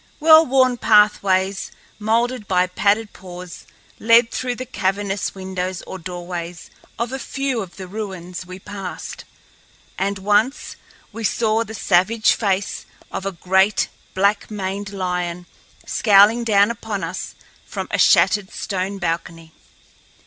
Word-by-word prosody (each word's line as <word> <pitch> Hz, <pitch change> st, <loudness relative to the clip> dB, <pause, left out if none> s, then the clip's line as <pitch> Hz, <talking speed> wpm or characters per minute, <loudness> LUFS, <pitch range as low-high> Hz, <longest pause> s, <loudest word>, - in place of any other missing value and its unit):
Well 315 Hz, +1 st, +7 dB
worn 255 Hz, -1 st, +3 dB
pathways, 200 Hz, -3 st, +3 dB, 0.3 s
molded 230 Hz, +1 st, 0 dB
by 180 Hz, -1 st, +3 dB
padded 205 Hz, +4 st, 0 dB
paws, 180 Hz, -1 st, -10 dB, 0.3 s
led 230 Hz, +1 st, +5 dB
through 250 Hz, -1 st, -2 dB
the 255 Hz, -, -6 dB
cavernous 195 Hz, -2 st, -2 dB
windows 185 Hz, -1 st, -4 dB
or 190 Hz, -, -8 dB
doorways 175 Hz, -1 st, -7 dB, 0.3 s
of 235 Hz, +2 st, -2 dB
a 265 Hz, -, -3 dB
few 270 Hz, -3 st, -2 dB
of 185 Hz, -3 st, -9 dB
the 190 Hz, -1 st, -8 dB
ruins 185 Hz, -3 st, -6 dB
we 185 Hz, 0 st, -9 dB
passed, 195 Hz, -1 st, -7 dB, 0.7 s
and 200 Hz, +1 st, -1 dB
once 210 Hz, +7 st, +1 dB, 0.4 s
we 230 Hz, -, -6 dB
saw 220 Hz, +1 st, +1 dB
the 220 Hz, 0 st, -9 dB
savage 210 Hz, +4 st, +3 dB
face 195 Hz, -2 st, -2 dB, 0.2 s
of 195 Hz, -, -4 dB
a -, -, -1 dB
great, 190 Hz, +3 st, +2 dB, 0.3 s
black 200 Hz, +2 st, +1 dB
maned 200 Hz, -1 st, -4 dB
lion 180 Hz, -2 st, -3 dB, 0.4 s
scowling 215 Hz, +2 st, +5 dB
down 205 Hz, -1 st, +4 dB
upon 220 Hz, -3 st, -5 dB
us -, -, -5 dB, 0.3 s
from -, -, -5 dB
a -, -, 0 dB
shattered 205 Hz, -2 st, +4 dB
stone 195 Hz, 0 st, -3 dB
balcony. 165 Hz, -2 st, -4 dB
200 Hz, 130 wpm, -21 LUFS, 185-220 Hz, 0.7 s, Well